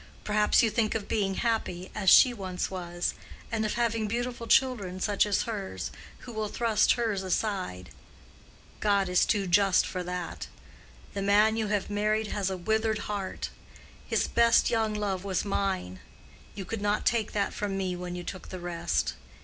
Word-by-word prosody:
Perhaps 210 +1 +3
you 225 - +2
think 220 -1 +1
of 215 -3 -3
being 195 -3 0
happy, 200 -6 -2
as 195 -3 +2
she 255 - +8
once 185 -5 -4
was, 175 -2 -3 0.4
and 225 -1 0
of 215 - -1
having 230 -2 0
beautiful 240 +1 -3
children 215 -10 +2
such 205 +2 +2
as 205 - +1
hers, 205 -4 -4 0.3
who 240 - -9
will 215 -1 -2
thrust 225 0 +2
hers 225 -5 -1
aside. 185 - -2 0.9
God 200 -2 +2
is 180 0 +3
too 205 -3 +1
just 190 +1 +4
for 185 - -4
that. 180 -1 -5 0.7
The 200 - -3
man 210 +2 +4
you 220 -1 -1
have 205 -1 -1
married 215 +1 0
has 200 -2 -1
a 190 - -3
withered 220 +4 0
heart. 195 -2 -4 0.6
His - - +1
best 235 0 +4
young 220 -2 +1
love 195 -3 -2
was 195 -1 -1
mine: 190 - -2 0.6
you 195 -2 -5
could 220 +3 -4
not 205 +1 0
take 225 -3 +1
that 200 -1 0
from 200 -2 -3
me 185 -2 -1
when 180 0 -5
you 175 - -5
took 185 +1 -7
the 185 - -6
rest. 170 -1 -1
205 Hz, 175 wpm, -28 LUFS, 185-220 Hz, 0.9 s, she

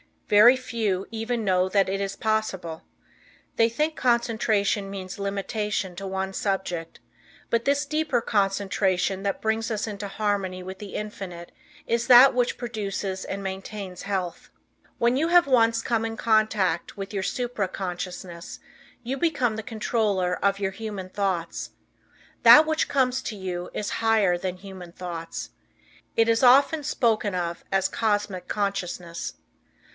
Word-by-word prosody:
Very 215 +5 +7
few 220 -7 -2
even 225 +1 -2
know 185 -2 +2
that 195 0 +2
it 195 +1 -1
is 195 0 -3
possible. 190 -7 -2 0.7
They 225 - +5
think 305 +7 -1
concentration 225 -4 +1
means 190 -1 -7
limitation 200 -1 -2
to 195 +1 -5
one 190 0 -2
subject, 190 -5 -3 0.5
but 230 0 +1
this 285 +1 +2
deeper 305 -4 0
concentration 195 -2 0
that 200 -1 -2
brings 220 +1 0
us 215 -2 -1
into 205 -1 -5
harmony 195 -3 -2
with 190 +1 -8
the 205 -2 -8
Infinite 190 -5 -6 0.3
is 235 0 0
that 255 +2 +9
which 245 -1 0
produces 200 -5 -4
and 200 0 -5
maintains 190 -1 -6
health. 190 -3 -3 0.5
When 240 +2 +2
you 315 +4 +1
have 350 0 +6
once 230 -3 +3
come 230 -2 0
in 225 0 -4
contact 215 -6 +1
with 195 +1 -6
your 195 -2 -1
supra 245 -4 -2
consciousness 180 -2 -6 0.4
you 255 +3 -3
become 265 -7 +1
the - - -3
controller 210 -4 0
of 200 0 +2
your 195 -1 -1
human 200 -2 -6
thoughts. 185 -4 -2 0.7
That 305 - +10
which 315 0 0
comes 260 -2 +1
to 220 - -4
you 180 -2 -5
is 210 - -3
higher 220 -5 +3
than 185 0 -4
human 185 -2 -10
thoughts. 170 -2 -6 0.6
It 225 0 +4
is 230 0 +3
often 275 +4 +5
spoken 220 -8 +1
of 170 -1 -3
as 195 -1 +2
Cosmic 205 -4 -1
Consciousness. 180 -4 -3
205 Hz, 145 wpm, -25 LUFS, 190-230 Hz, 0.7 s, That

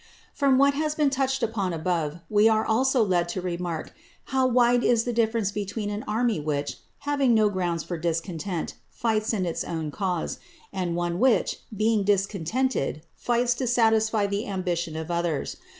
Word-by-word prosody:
_ - - -27 0.3
From 275 -2 +3
what 280 +1 +5
has 305 +1 -1
been 295 -3 +2
touched 270 0 0
upon 200 -5 -1
above, 165 -1 -2
we 210 +1 +4
are 220 0 +2
also 255 +2 +3
led 175 -4 +1
to 180 - -3
remark 175 -2 -4 0.3
how 265 -1 +1
wide 245 -1 +3
is 235 -2 +3
the 245 - -2
difference 225 -3 +1
between 205 +1 -3
an 205 +1 -4
army 225 -1 +1
which, 145 -1 -2 0.2
having 280 -4 +2
no 215 -1 +4
ground 175 -4 -1
for 175 -2 -5
discontent, 170 +1 -3 0.2
fights 220 -2 0
in 200 -5 0
its 170 - -2
own 160 -3 -4
cause, 180 0 -2 0.3
and 175 -2 -2
one 175 0 -1
which, 250 -5 +2 0.2
being 215 0 +2
discontented, 195 - 0
fights 240 0 +1
to 250 +1 -3
satisfy 220 -2 +3
the 200 +2 -2
ambition 175 -4 -2
of 160 +1 -4
others. 170 -4 -1
205 Hz, 170 wpm, -26 LUFS, 175-235 Hz, 0.3 s, what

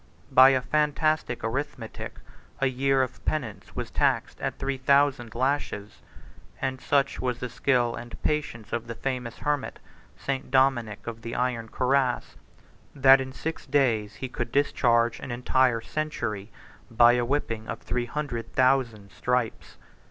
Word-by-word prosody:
By 130 +1 +9
a 130 -1 +2
fantastic 150 -2 0
arithmetic, 130 0 -4 0.4
a 135 - +2
year 135 +1 +2
of 130 - -7
penance 125 -9 -3
was - - -4
taxed - - 0
at - - -2
three 135 -1 -2
thousand 135 -3 +2
lashes; 125 -5 -2 0.6
25 - - -13
and 130 -1 -2
such 140 -1 +1
was 125 -2 -1
the 125 0 -5
skill 125 -1 +1
and 120 0 -8
patience 140 -8 -2
of 120 0 -3
a 115 - -4
famous 125 -2 -4
hermit, 145 -2 -2 0.4
St. 135 -2 -3
Dominic 130 -5 +2
of 115 -1 -6
the 115 +1 -5
iron 120 -2 -1
Cuirass, 130 0 +1 0.6
26 140 - -14
that 135 0 +8
in 130 0 -5
six 160 +4 -5
days 115 -7 +1
he 130 - -5
could 125 - -4
discharge 120 -4 +2
an - - -7
entire 125 -1 +2
century, 115 -9 -3 0.4
by 120 0 +6
a 120 0 +1
whipping 115 -4 -2
of - - -4
three 125 -1 -2
hundred 130 -5 -4
thousand 125 -6 +2
stripes. 125 -2 -2
125 Hz, 150 wpm, -26 LUFS, 115-135 Hz, 0.6 s, By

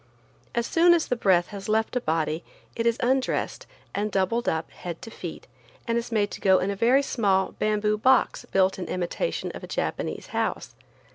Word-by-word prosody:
As 235 0 +1
soon 345 +4 +5
as 330 - +1
the 250 - 0
breath 185 -6 +3
has 200 0 -7
left 220 +3 +1
a 250 - +1
body 160 -1 -1 0.3
it 230 0 0
is 230 - +2
undressed 260 +1 0 0.3
and 210 +1 -1
doubled 200 +6 +1
up, 160 0 -2
head 170 -2 -7
to 225 - -8
feet, - - -7 0.4
and 230 - +1
is 235 +1 -2
made 205 -2 +1
to - - -7
go 190 -1 +5
in 190 +2 0
a - - -3
very 250 +7 +4
small 195 -8 +1
bamboo 210 0 +1
box 260 +1 +3
built 190 -4 +2
in 180 - -4
imitation 180 - -2
of - - -9
a - - -6
Japanese - - -3
house. - - -2
210 Hz, 195 wpm, -26 LUFS, 190-235 Hz, 0.4 s, soon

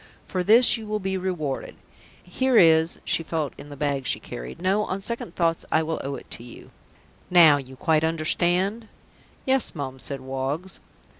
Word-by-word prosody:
For 185 -1 -2
this 235 +5 +6
you 220 -1 -9
will 215 0 -1
be 190 -1 -2
rewarded. 180 -7 -3 0.5
Here 255 +7 +1
is 160 -2 +5
" - - -33
She - - 0
felt 160 -3 -3
in 145 - -12
the 145 - -10
bag 140 -2 -2
she - - 0
carried. - - -8
"No, 195 +3 +1
on 185 - -3
second 195 -3 -4
thoughts 165 -2 0
I 160 - +3
will 160 0 -3
owe 140 +1 -4
it - - -10
to - - -8
you. 120 - -13 0.6
Now 165 -5 +7
you 130 -1 -9
quite 155 +3 +1
understand?" 175 +7 0 0.6
"Yes, 265 -6 +1
Mum," 130 -3 -5
said 135 +2 -4
Woggs. 135 +7 -4
165 Hz, 180 wpm, -24 LUFS, 140-190 Hz, 0.6 s, Now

